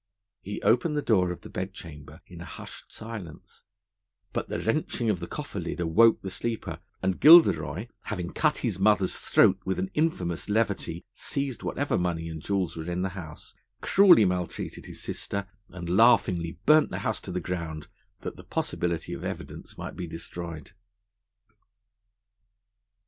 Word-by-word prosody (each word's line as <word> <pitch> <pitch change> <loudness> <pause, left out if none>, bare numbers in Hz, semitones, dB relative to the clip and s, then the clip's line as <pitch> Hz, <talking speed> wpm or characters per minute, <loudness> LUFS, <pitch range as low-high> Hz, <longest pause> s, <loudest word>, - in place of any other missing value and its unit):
He 105 +2 -5
opened 150 +7 +3
the 145 - 0
door 95 -6 +3
of 90 - -7
the - - -11
bed 95 +1 -4
chamber 75 -5 -11
in - - -11
a - - -7
hushed - - -9
silence; 110 -8 -9 0.7
but - - -3
the - - -2
wrenching 115 -2 0
of 95 - -2
the 85 - -6
cofferlid 100 - -5
awoke 100 +7 +4
the 95 - -4
sleeper, 110 -8 -3 0.2
and 95 -1 0
Gilderoy, 95 - +7 0.2
having 90 -4 -4
cut 155 -2 +2
his 100 -6 -1
mother's 100 -2 +3
throat 95 0 +4
with 95 0 -1
an 95 +1 -2
infamous 95 - -1
levity, 100 -6 -1
seized 140 -3 -3
whatever 145 -8 -1
money 85 -2 -2
and 80 -1 -6
jewels 95 -3 -1
were 80 +1 -5
in 90 +1 -1
the 95 - 0
house, 85 -5 -10 0.3
cruelly 185 - +6
maltreated 90 -1 -3
his - - -8
sister, 100 -1 -3 0.2
and 90 -1 -8
laughingly 90 -4 +3
burnt 155 +1 +6
the - - -4
house - - -1
to - - -7
the 90 - -1
ground, 85 -4 -5 0.3
that - - -6
the - - -11
possibility 85 -2 -2
of - - -6
evidence - - -7
might - - -6
be 90 - -5
destroyed. 85 -1 -7
95 Hz, 160 wpm, -27 LUFS, 85-110 Hz, 0.7 s, Gilderoy